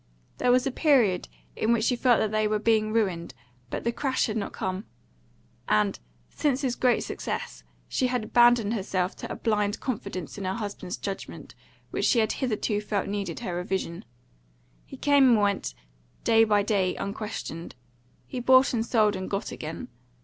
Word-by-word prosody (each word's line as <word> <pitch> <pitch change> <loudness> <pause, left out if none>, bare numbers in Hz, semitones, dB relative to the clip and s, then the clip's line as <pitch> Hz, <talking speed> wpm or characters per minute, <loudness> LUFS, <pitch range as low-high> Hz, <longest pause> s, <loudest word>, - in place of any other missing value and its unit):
There 250 - +3
was 250 +1 +4
a 270 - 0
period 245 - +3 0.3
in 220 - +1
which 230 -2 +2
she 245 - +2
felt 245 -1 +4
that 215 - 0
they 215 0 +2
were 215 0 +1
being 215 0 +2
ruined, 185 - -1 0.3
but - - -4
the 235 - +1
crash 260 +2 0
had 215 - -3
not 215 - -2
come; 190 +3 -4 0.8
and, 210 -2 +2 0.3
since 280 -3 0
his 255 -3 0
great 250 -2 +2
success, - - -5 0.2
she 255 - 0
had 250 -2 -1
abandoned 240 -1 +4
herself 190 -3 -1
to - - -7
a - - -3
blind 210 -2 0
confidence 200 - -5
in 195 - -4
her 190 +1 -1
husband's 205 -5 -5
judgment, 195 -1 -6 0.4
which - - -1
she - - +3
had 220 -2 +3
hitherto 215 -4 -1
felt 210 -2 -2
needed 200 -2 -3
her 190 -7 -3
revision. 180 -1 -3 0.8
He - - -10
came 280 -3 +5
and 220 - +4
went, 200 - 0 0.5
day 225 0 +5
by 210 -2 +3
day, 200 -3 +1
unquestioned. 200 -5 -5 0.5
He 255 - -5
bought 260 +2 +5
and 225 -2 +1
sold 215 -3 +2
and 185 0 -5
got 200 0 -3
gain. 155 -3 -6
215 Hz, 175 wpm, -27 LUFS, 195-240 Hz, 0.8 s, came